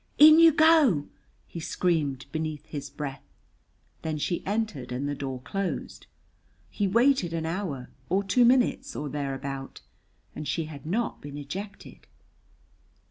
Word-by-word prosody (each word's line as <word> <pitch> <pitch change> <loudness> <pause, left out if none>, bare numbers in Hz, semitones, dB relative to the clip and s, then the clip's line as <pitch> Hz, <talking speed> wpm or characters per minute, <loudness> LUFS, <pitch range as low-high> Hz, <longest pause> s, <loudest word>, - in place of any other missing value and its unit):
"In 310 +2 +9
you 330 -1 +8
go!" 305 - +5 0.4
he 170 - -8
screamed 155 -6 -1
beneath 155 -2 -3
his 145 -3 -6
breath. 140 -3 -6 0.8
Then 155 -1 -2
she 170 +4 -2
entered 205 - -2
and 130 +3 -2
the 145 - -1
door 135 -3 -5
closed. 195 +7 -4 0.6
He 205 - 0
waited 230 -4 +3
an 165 -1 -2
hour, 160 -7 -4 0.2
or 195 +3 +2
two 200 +6 +3
minutes, 260 +2 +3
or 145 0 -4
thereabout, 135 -1 -5 0.5
and 150 - -5
she 165 - -1
had 150 -2 -10
not 225 +7 -1
been 145 0 -8
ejected. 195 +8 -8
160 Hz, 135 wpm, -27 LUFS, 145-210 Hz, 0.8 s, In